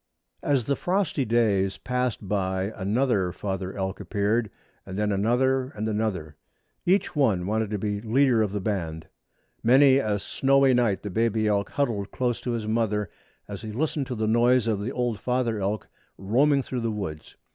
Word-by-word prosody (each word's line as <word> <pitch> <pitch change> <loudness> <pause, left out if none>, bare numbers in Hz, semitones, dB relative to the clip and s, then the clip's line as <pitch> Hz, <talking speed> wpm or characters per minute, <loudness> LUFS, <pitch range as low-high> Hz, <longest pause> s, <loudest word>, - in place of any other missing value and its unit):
As 135 -5 +1
the 140 - +1
frosty 180 -7 0
days 100 -5 +2
passed 125 -5 -2
by 95 0 -1
another 100 -2 +1
father 95 +1 -4
elk 95 0 -3
appeared, 105 +3 0 0.3
and 95 0 -7
then 105 0 +1
another 125 +6 +2
and 110 +1 -3
another. 105 -9 -2 0.5
Each 185 -1 +2
one 110 -12 +2
wanted 110 +1 0
to 105 - -2
be 105 0 -2
leader 120 +1 +3
of 105 -3 0
the 105 - -2
band. 85 -6 -3 0.6
Many 135 +3 +6
a 105 -6 0
snowy 135 +5 +3
night 120 -5 +1
the 105 - -4
baby 110 +1 +1
elk 100 -1 +1
huddled 115 -9 -1
close 125 -2 -1
to 125 - -3
his 115 -2 -3
mother 110 -2 0 0.4
as 100 -1 -7
he 110 -1 -6
listened 145 +3 -1
to 125 - -4
the 110 -1 -1
noise 120 +2 +3
of 110 -3 0
the 115 +5 -3
old 120 -5 -1
father 125 -2 0
elk 100 +1 -2 0.3
roaming 135 +8 +2
through 125 -1 -4
the 115 - -1
woods. 95 -8 -6
110 Hz, 175 wpm, -26 LUFS, 100-125 Hz, 0.6 s, Many